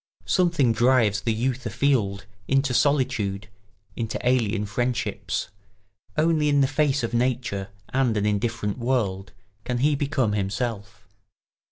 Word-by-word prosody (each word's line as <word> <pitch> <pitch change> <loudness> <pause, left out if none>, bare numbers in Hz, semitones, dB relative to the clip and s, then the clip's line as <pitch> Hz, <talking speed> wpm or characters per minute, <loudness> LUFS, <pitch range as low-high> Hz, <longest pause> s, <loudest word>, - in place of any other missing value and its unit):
Something 165 -10 +2
drives 115 -4 +3
the 115 - 0
youth 125 +3 -1
afield, 105 -9 0 0.2
into 135 -1 +2
solitude, 120 -9 +1 0.5
into 115 -2 -3
alien 115 -4 +1
friendships; 105 -4 -2 0.7
only 155 -1 +2
in 145 -1 +3
the 135 - +4
face 145 -1 +1
of 115 0 -3
nature 120 -5 -1 0.2
and 130 -4 +1
an 105 - 0
indifferent 105 +1 -1
world 105 -6 -1 0.3
can 125 +1 -2
he 145 +5 +2
become 140 -5 0
himself. 105 0 -3
120 Hz, 125 wpm, -24 LUFS, 105-135 Hz, 0.7 s, the